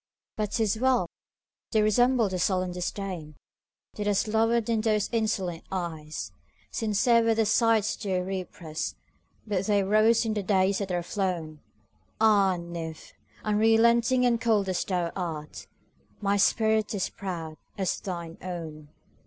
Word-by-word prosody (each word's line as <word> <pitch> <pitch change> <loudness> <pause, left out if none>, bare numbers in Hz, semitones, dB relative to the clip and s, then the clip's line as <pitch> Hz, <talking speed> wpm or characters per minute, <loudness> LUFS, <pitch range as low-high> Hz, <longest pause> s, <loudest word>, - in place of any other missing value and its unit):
But 210 -2 -2
't 225 - +2
is 220 +1 0
well!—they 245 -2 -2
resemble 235 +2 +3
the 185 -1 -3
sullen 185 -1 0
disdainThat 180 -4 -5 0.7
has 205 +1 +1
lowered 225 +1 +2
in 225 -2 +1
those 215 -2 +1
insolent 200 -7 -1
eyes. 160 -5 -4 0.4
Sincere 230 +2 +2
were 225 0 +2
the 225 0 +2
sighs 225 -1 +3
they 190 -3 -1
represt, 180 -4 -4 0.5
But 195 -3 -1
they 205 -2 +3
rose 215 +4 +4
in 220 - 0
the 210 - -1
days 190 0 +2
that 195 -2 -3
are 175 -1 -1
flown! 170 -6 -3 0.6
Ah, 200 -4 +4
nymph! 170 -2 -7 0.3
unrelenting 230 +4 +4
and 235 -2 +2
cold 215 -4 +2
as 185 - 0
thou 175 -3 -1
art, 160 -5 -5 0.5
My 200 -1 +1
spirit 220 +1 +2
is 190 - -1
proud 165 -5 -6 0.2
as 190 -2 -1
thine 170 -3 -6
own! 160 -5 -7
200 Hz, 135 wpm, -27 LUFS, 180-220 Hz, 0.7 s, rose